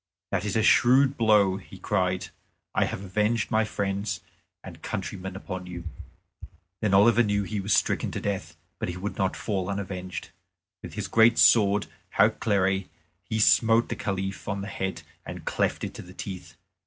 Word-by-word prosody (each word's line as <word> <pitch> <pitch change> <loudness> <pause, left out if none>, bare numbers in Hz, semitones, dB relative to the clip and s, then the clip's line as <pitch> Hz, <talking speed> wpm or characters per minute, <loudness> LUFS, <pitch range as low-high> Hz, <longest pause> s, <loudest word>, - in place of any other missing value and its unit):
"That - - -1
is 105 - -2
a 110 - +2
shrewd 130 +4 +5
blow," 105 -5 +4
he 100 - -12
cried; 90 0 -1 0.4
"I - - +2
have 95 - -5
avenged 105 +5 0
my 110 -1 +3
friends 100 -2 -2 0.4
and 85 -4 -11
countrymen 95 -1 -5
upon 95 -2 -6
you." 85 -1 -7 1.0
Then 100 -3 +2
Oliver 115 +4 +6
knew 105 -2 +1
he 105 +1 -3
was 100 +2 -3
stricken 105 - +1
to - - -2
death, 100 -2 -4 0.2
but - - -2
he 90 - -5
would 100 +3 -5
not 95 -1 +1
fall 95 -4 -2
unavenged. 95 -3 -5 0.5
With - - -9
his 105 -2 -3
great 115 +4 +5
sword 105 -2 +5 0.3
Hautclere 95 -2 +2 0.3
he 110 +3 -4
smote 115 +2 +4
the - - -2
Caliph 95 -1 -4
on 100 -1 -2
his 100 - -6
head 95 0 -3 0.2
and - - -8
cleft - - -1
it - - -4
to - - -8
the 90 +1 -13
teeth. 95 -3 -7
100 Hz, 170 wpm, -26 LUFS, 95-110 Hz, 1.0 s, Oliver